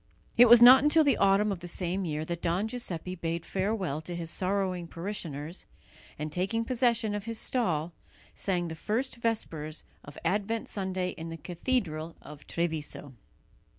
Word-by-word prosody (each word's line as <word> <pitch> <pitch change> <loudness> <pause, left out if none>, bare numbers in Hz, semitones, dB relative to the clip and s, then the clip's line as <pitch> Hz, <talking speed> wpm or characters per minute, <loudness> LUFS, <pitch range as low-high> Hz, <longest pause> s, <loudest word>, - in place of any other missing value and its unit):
It 245 0 +7
was 240 0 +10
not 255 +2 +10
until 310 +2 +5
the 280 -4 +3
autumn 200 +2 +3
of 190 - -3
the 175 - -8
same 180 +2 -1
year 155 -1 -2
that 170 +1 -4
Don 175 +5 0
Giuseppe 185 -7 -4
bade 170 -1 -3
farewell 190 -6 -1
to 175 +2 -6
his 170 -1 -3
sorrowing 185 -2 -1
parishioners, 165 -3 -5 0.5
and, 150 +1 -4
taking 195 +7 -1
possession 235 -3 +1
of 205 0 -4
his 230 -1 -3
stall, 175 - 0 0.4
sang 180 -3 -1
the 160 - -5
first 230 - -2
vespers 165 -10 -3 0.2
of 145 - -12
Advent 205 +5 -1
Sunday 190 -2 -2
in 165 -2 -7
the 165 - -6
cathedral 170 - -2
of 150 -1 -13
Treviso. 160 -4 -3
185 Hz, 160 wpm, -29 LUFS, 165-220 Hz, 0.5 s, was